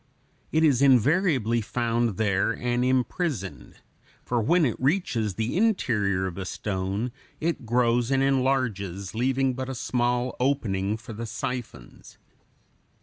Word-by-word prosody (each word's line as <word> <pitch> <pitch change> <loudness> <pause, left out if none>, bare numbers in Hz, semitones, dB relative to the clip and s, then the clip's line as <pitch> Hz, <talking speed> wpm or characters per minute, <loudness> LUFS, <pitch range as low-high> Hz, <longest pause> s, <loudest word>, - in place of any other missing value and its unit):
It 160 +1 +2
is 140 -5 +4
invariably 135 - +3
found 115 -2 -1
there 100 -3 +1
and 120 0 -1
imprisoned; 130 - -1 0.5
for 120 -1 0
when 165 +8 +3
it 120 - 0
reaches 130 - 0
the 110 +5 -2
interior 115 - +1
of 95 0 -5
a 95 - -4
stone, 100 +5 -3 0.3
it 160 -7 -2
grows 120 0 +2
and 135 0 +2
enlarges, 125 -9 0
leaving 130 +3 +1
but 130 +1 -5
a 135 - -4
small 125 0 0
opening 105 -6 0
for 115 +1 -10
the 115 +2 -5
siphons. 120 - -6
120 Hz, 130 wpm, -26 LUFS, 105-135 Hz, 0.5 s, is